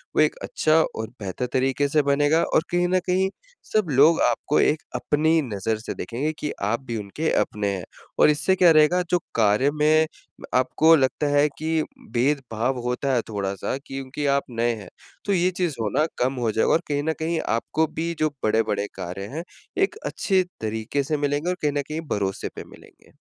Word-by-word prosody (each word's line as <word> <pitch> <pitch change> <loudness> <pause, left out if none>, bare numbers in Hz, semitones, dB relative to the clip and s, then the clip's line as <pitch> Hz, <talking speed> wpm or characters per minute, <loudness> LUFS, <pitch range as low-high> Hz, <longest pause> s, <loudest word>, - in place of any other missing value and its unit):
वो - - +5
एक - - +3
अच्छा 160 - +2 0.2
और 110 0 -4
बेहतर 100 +5 -3
तरीके 135 +2 +1
से 150 +1 +3
बनेगा 145 +3 +3
और - - +2
कहीं 175 0 +2
न - - +4
कहीं 190 +1 +2 0.4
सब 215 -5 +2
लोग 150 +5 +5
आपको 120 +4 +2
एक 150 - +2
अपनी 160 +2 +2
नज़र 110 +3 -1
से 110 - -5
देखेंगे 140 +7 -3
कि 150 - -2
आप 115 +5 0
भी 115 -2 -3
उनके 105 +11 -3
अपने 105 -1 -2
हैं। 90 - -6 0.4
और - - +7
इससे 150 +6 +2
क्या 180 -3 +6
रहेगा 155 +3 +5
जो 180 - +3 0.2
कार्य 115 +6 +3
में 155 +1 +3 0.4
म - - -12
आपको 155 +6 +5
लगता 140 +1 +1
है 145 +1 +4
कि 160 0 0 0.3
भेदभाव 130 -1 0
होता 125 +3 -1
है 120 - +2
थोड़ा-सा 100 +3 -3
क्योंकि 135 +2 -5
आप 140 - +1
नए 120 0 0
हैं। 100 -4 -10 0.4
तो 200 - +1
ये 180 0 +2
चीज़ 175 -6 0
होना 115 +9 +1 0.2
कम 130 +2 +2
हो 120 -3 0
जाएगा, 110 - +1
और 165 - +3
कहीं 145 -1 -1
न 160 - 0
कहीं 160 +1 -1 0.2
आपको 155 +7 0
भी 170 +1 -1
जो 155 0 +2
बड़े-बड़े 105 -2 +1
कार्य 95 +1 -5
हैं, 165 - -3 0.3
एक 390 +2 +1
अच्छे 190 -2 +1 0.2
तरीके 110 +5 -2
से 150 +2 -1
मिलेंगे 145 +4 -1
और 180 - 0
कहीं 150 -1 +1
न - - +1
कहीं 155 +1 -3
भरोसे 95 -2 -2
पे - - -6
मिलेंगे। - - -18
145 Hz, 195 wpm, -24 LUFS, 115-160 Hz, 0.4 s, और